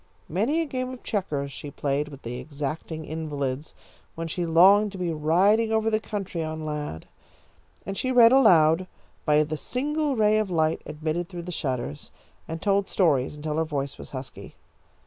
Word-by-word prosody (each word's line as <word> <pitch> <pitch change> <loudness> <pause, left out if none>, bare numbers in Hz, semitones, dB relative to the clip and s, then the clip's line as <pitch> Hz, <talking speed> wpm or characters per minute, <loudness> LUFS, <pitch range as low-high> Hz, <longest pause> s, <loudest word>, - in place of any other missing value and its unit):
Many 230 - +1
a - - -1
game 255 -3 -3
of 255 - -10
checkers 145 -9 -2
she 145 - -8
played 140 +1 -1
with 140 -2 -12
the 120 +1 -5
exacting 155 +2 -5
invalids, 145 -3 -4 0.4
when 165 0 -4
she 170 +1 -2
longed 195 +6 +6
to - - -7
be 175 -2 -1
riding 190 +9 +3
over 220 0 +2
the 215 - +2
country 195 -6 -4
on 155 0 -5
Lad. 150 - -4 0.8
And 195 - -4
she 255 +5 -1
read 240 -2 +7
aloud 180 -9 +5 0.4
by 150 0 +4
the 155 +1 -4
single 295 - -1
ray 215 -1 +4
of 215 -2 -1
light 160 -2 +1
admitted 160 +3 -3
through 175 -2 -7
the 180 - -6
shutters, 125 - -3 0.4
and 160 0 -6
told 200 -1 +2
stories 150 -7 +2
until 150 +1 -3
her 160 - +2
voice 140 -3 -4
was - - -9
husky. 130 -1 -8
165 Hz, 175 wpm, -26 LUFS, 150-210 Hz, 0.8 s, read